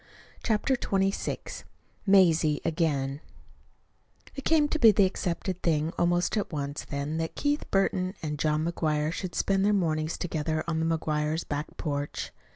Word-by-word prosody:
CHAPTER 230 +4 +1
XXVI 195 -4 -2 0.4
MAZIE 165 -6 +5
AGAIN 150 -4 0 1.1
It 275 - -6
came 310 -2 +3
to 315 - -1
be 230 - +8
the 200 -1 +4
accepted 185 0 -2
thing 160 0 +1
almost 175 0 +1
at 205 - -2
once, 145 -2 -4
then, 145 +2 -3
that 165 0 -3
Keith 290 +1 -1
Burton 190 -1 +1
and 150 -2 -3
John 155 +1 +1
McGuire 155 -2 0
should 185 0 -5
spend 195 -1 +1
their 210 +1 +3
mornings 155 -4 0
together 155 -2 -2
on 160 -1 0
the 160 - +1
McGuires' 155 +1 -1
back 145 +1 -4
porch. 145 -1 -3
165 Hz, 150 wpm, -28 LUFS, 150-195 Hz, 1.1 s, be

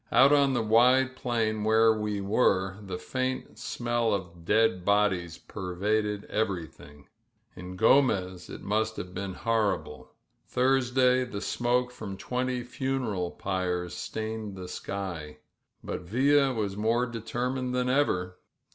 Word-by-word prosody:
Oot 135 +2 +6
on 140 -2 +4
the 120 - +1
wide 125 +4 +4
plain 115 -4 -1
where 110 +1 +5
we 105 -2 -2
were 95 -2 +1 0.2
faint 130 +5 -3
smell 120 -2 0
of 85 -3 -7
dead 110 -3 +3
bodies 95 -4 +1
perraded 105 +2 -2
ererythi 80 -8 -4 0.5
In 90 0 -8
Gromez 95 -7 +3
it - - -9
must 110 +2 0
ha^e 90 0 -6
been 95 0 -4
horrible. 110 -3 -1 0.3
Thursday 125 0 +2
smoke 125 +3 0
from 105 -5 -7
twenty 125 +2 -2
funeral 125 -8 -2
pyres 90 -2 -2
stained 110 +1 -5
the 90 -1 -7
sky. 90 -6 -5 0.3
] - - -48
Villa 135 +9 +2
was 105 -5 -2
more 115 +4 +1
determined 125 +2 -3
than 125 0 0
ever. 90 -10 0
110 Hz, 120 wpm, -28 LUFS, 95-125 Hz, 0.5 s, Oot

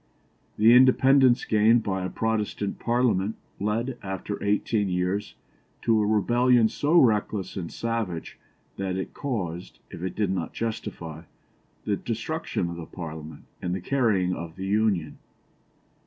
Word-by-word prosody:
The 110 +2 +6
independence 130 0 +5
gained 110 +2 +4
by 95 -2 -2
a 95 - -2
Protestant 105 -2 -2
Parliament 115 -4 +1 0.2
led, 115 +5 -2
after 95 +1 -5
eighteen 105 0 +1
years, 90 +3 -1 0.5
to 110 -2 +3
a 105 - +1
rebellion 120 +2 +3
so 155 +8 +3
reckless 105 - +1
and 90 -4 -5
savage 115 -8 -3 0.4
that 95 -1 -2
it 95 - -4
caused, 95 - -4
if - - -8
it 95 0 -4
did 105 -3 0
not 90 -3 -3
justify, 85 -8 -5 0.6
the 100 -1 0
destruction 115 - -3
of 85 - -7
the 85 - -7
Parliament 80 -3 -8 0.2
and 90 0 -2
the - - -3
carrying 100 -5 +1
of 85 -2 -6
the 95 - -5
Union. 100 -6 0
105 Hz, 140 wpm, -26 LUFS, 90-115 Hz, 0.6 s, The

